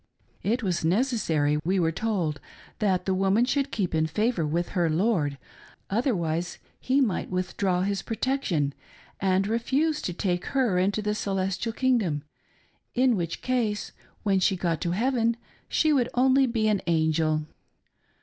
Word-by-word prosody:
It 235 +4 0
was 180 -5 -1
ne 180 +8 +3
cessary, 160 - 0
we 185 +3 +1
were 165 -2 +2
told, 175 -6 -1 0.4
that 185 -4 +1
the 190 - +1
woman 195 +5 +3
should 280 +1 0
keep 195 -5 -1
in 160 0 +2
favor 200 0 0
with 170 +3 -1
her 175 -4 +1
lord, 160 -5 +1 0.5
otherwise 180 - 0 0.2
he 265 +2 +1
might 235 -9 0
withdraw 185 0 0
his 200 0 -1
protection 220 - -1 0.5
and 190 0 +2
refuse 275 +8 0
to - - -2
take 180 0 -1
her 230 -9 +3
into 200 +3 +1
the 210 0 0
celestial 195 +2 -2
kingdom; 220 - +1 0.7
in 250 -1 +4
which 170 -3 -3
case 235 -5 -1 0.3
when 195 -3 +2
she 190 +1 +2
got 170 -3 -1
to 170 - -1
heaven 235 +1 +1 0.3
she 310 -1 +3
would 250 -4 +2
only 265 +2 +4
be 225 -2 0
an 210 -3 +2
angel 160 -1 +1
195 Hz, 150 wpm, -26 LUFS, 170-235 Hz, 0.7 s, in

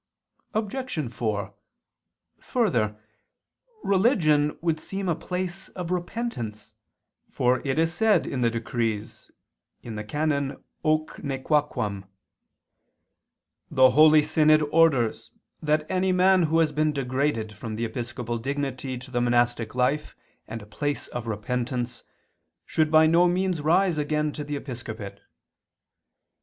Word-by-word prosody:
Obj. 215 - -2
4: 105 -4 -2 0.9
Further, 115 - 0 0.8
religion 175 - +3
would 165 -2 0
seem 195 +4 -4
a 175 - +2
place 180 +3 -5
of 180 -2 -6
repentance; 175 - -4 0.6
for 125 0 +1
it 135 +1 -1
is 165 +1 +2
said 210 -2 +3
in 130 - -3
the 120 - +3
Decrees 115 -2 -3 0.5
(VII, 120 - -7
qu. 105 - -5
i, - - -4
can. 140 +3 -1 0.3
Hoc 155 0 0
nequaquam): 135 -8 -1 1.6
"The 130 -1 +5
holy 155 +1 +6
synod 155 0 +4
orders 150 -9 +3 0.3
that 155 0 +1
any 185 +1 +1
man 185 +1 +4
who 165 - +2
has 160 -2 +3
been 155 +1 +1
degraded 130 -4 -1
from 110 +1 -6
the 115 +2 -2
episcopal 120 0 -4
dignity 135 0 -3
to 130 +2 -9
the 120 -1 0
monastic 120 -1 +1
life 130 +4 0 0.3
and 110 0 -6
a - - -12
place 145 +8 -3
of 120 -1 -5
repentance, 120 +3 -3 0.6
should 155 -1 +1
by 155 0 +6
no 170 +3 +5
means 180 -2 0
rise 170 +2 +2
again 150 0 0
to 150 - -6
the 145 0 -4
episcopate." 115 -7 -7
145 Hz, 125 wpm, -26 LUFS, 120-165 Hz, 1.6 s, holy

